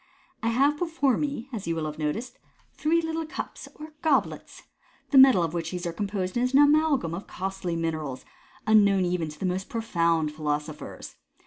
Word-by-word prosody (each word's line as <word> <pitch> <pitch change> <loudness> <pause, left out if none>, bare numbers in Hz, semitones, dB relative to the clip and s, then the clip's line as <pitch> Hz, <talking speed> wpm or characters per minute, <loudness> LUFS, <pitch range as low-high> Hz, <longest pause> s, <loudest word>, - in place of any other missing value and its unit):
" - - -36
I - - -1
have 280 +6 +2
before 320 -7 +1
me, 280 -5 -3
as 205 -6 -5
you 165 - 0
will 160 -1 -2
have 155 0 -6
noticed, 220 +12 -3 0.3
three 330 +2 +1
little 325 0 -2
eups 315 - -7
or 310 0 -10
goblets. 320 - 0 0.5
The 275 - +7
metal 265 -10 +7
of 165 -1 -2
which 170 -1 -3
these 180 -1 -5
are 170 - -3
composed 195 +1 -3
is 250 +2 0
an 275 - +6
amalgam 290 - +3
of 180 +4 -6
costly 190 -2 -4
minerals, 155 -5 -3 0.4
unknown 200 -3 +4
even 175 -3 -1
to 150 - -12
the - - -2
most 185 +1 -2
profound 170 -8 0
philosophers. 150 0 -5
195 Hz, 185 wpm, -26 LUFS, 165-270 Hz, 0.5 s, The